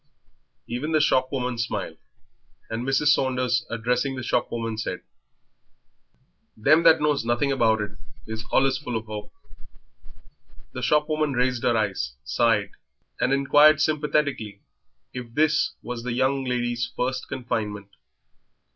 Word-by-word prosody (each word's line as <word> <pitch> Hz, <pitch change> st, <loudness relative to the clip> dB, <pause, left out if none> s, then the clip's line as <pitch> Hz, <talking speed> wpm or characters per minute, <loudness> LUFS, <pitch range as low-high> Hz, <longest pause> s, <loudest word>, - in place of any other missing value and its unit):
Even 135 Hz, +7 st, -3 dB
the 155 Hz, -, +4 dB
shopwoman 130 Hz, -4 st, +1 dB
smiled, 120 Hz, -, -3 dB, 0.7 s
and 115 Hz, +1 st, -3 dB
Mrs. 135 Hz, +3 st, +2 dB
Saunders, 125 Hz, -4 st, +1 dB
addressing 125 Hz, +4 st, -1 dB
the 130 Hz, -, -5 dB
shopwoman, 115 Hz, -2 st, -1 dB
said 110 Hz, -, -4 dB, 1.5 s
"Them 150 Hz, +9 st, +4 dB
that 165 Hz, -1 st, +6 dB
knows 150 Hz, -4 st, +1 dB
nothing 120 Hz, +4 st, 0 dB
about 110 Hz, -5 st, +2 dB
it 105 Hz, -1 st, -4 dB, 0.3 s
is 110 Hz, 0 st, -6 dB
allus 135 Hz, -1 st, +3 dB
full 125 Hz, -5 st, -5 dB
of 110 Hz, -1 st, -4 dB
'ope." 105 Hz, -1 st, -7 dB, 1.4 s
The 130 Hz, -, -5 dB
shopwoman 150 Hz, +2 st, +1 dB
raised 125 Hz, -1 st, 0 dB
her 120 Hz, -2 st, +2 dB
eyes, 95 Hz, -, -2 dB
sighed, 105 Hz, -, +1 dB, 0.5 s
and 125 Hz, -, +1 dB
inquired 145 Hz, +2 st, +5 dB
sympathetically 150 Hz, -9 st, -1 dB, 0.5 s
if 120 Hz, -2 st, -8 dB
this 155 Hz, 0 st, +2 dB
was 120 Hz, +1 st, -5 dB
the 120 Hz, 0 st, -3 dB
young 130 Hz, +2 st, +1 dB
lady's 120 Hz, -1 st, -1 dB
first 130 Hz, +1 st, -2 dB
confinement. 105 Hz, -5 st, -4 dB
125 Hz, 125 wpm, -24 LUFS, 115-140 Hz, 1.5 s, that